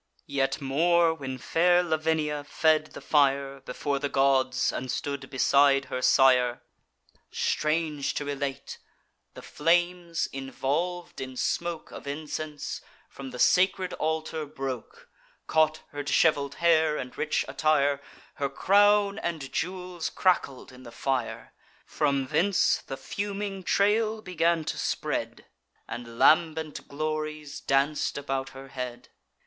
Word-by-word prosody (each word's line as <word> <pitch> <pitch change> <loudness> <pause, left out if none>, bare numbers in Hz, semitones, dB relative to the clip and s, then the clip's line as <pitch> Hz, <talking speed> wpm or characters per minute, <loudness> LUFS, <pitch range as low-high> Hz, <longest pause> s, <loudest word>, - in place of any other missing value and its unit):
Yet 135 -1 -1
more, 165 +4 +3
when 135 -4 -6
fair 175 +7 +3
Lavinia 155 -2 0
fed 155 +1 +2
the - - -9
fire 140 -2 +2
Before 140 +2 -3
the 145 0 -2
gods, 135 -1 +2
and 130 -1 -4
stood 140 -1 -4
beside 140 +1 +4
her 130 - -1
sire, 125 -2 +4 0.7
Strange 155 -2 -1
to 145 - -2
relate, 140 -1 -4 0.6
the - - -10
flames, 175 +1 +1
involv'd 145 +6 -3
in 130 -1 -6
smoke 165 +4 -2
Of - - -10
incense, 150 +1 -5 0.3
from 135 -1 -8
the 125 - -8
sacred 185 +6 +3
altar 160 0 -2
broke, 135 - -6 0.4
Caught 155 0 +2
her 145 - -5
dishevel'd 140 -1 +2
hair 160 -2 +3
and 125 -1 -6
rich - - 0
attire; 145 -2 +2 0.4
Her 140 -1 -1
crown 205 +6 +3
and 155 -9 -4
jewels 180 -1 -3
crackled 175 -10 0
in 125 0 -14
the 120 -2 -11
fire: 130 -3 -3 0.3
From 140 -2 0
thence 165 +8 +2
the 135 - -5
fuming 200 +6 -4
trail 215 +3 +1
began 170 -3 +1
to - - -3
spread - - -3 0.4
And 115 -1 -7
lambent 160 0 +3
glories 155 0 -4
danc'd 140 +3 +1
about 135 -1 -3
her 135 0 -10
head. 125 -2 -6
150 Hz, 125 wpm, -27 LUFS, 135-170 Hz, 0.7 s, beside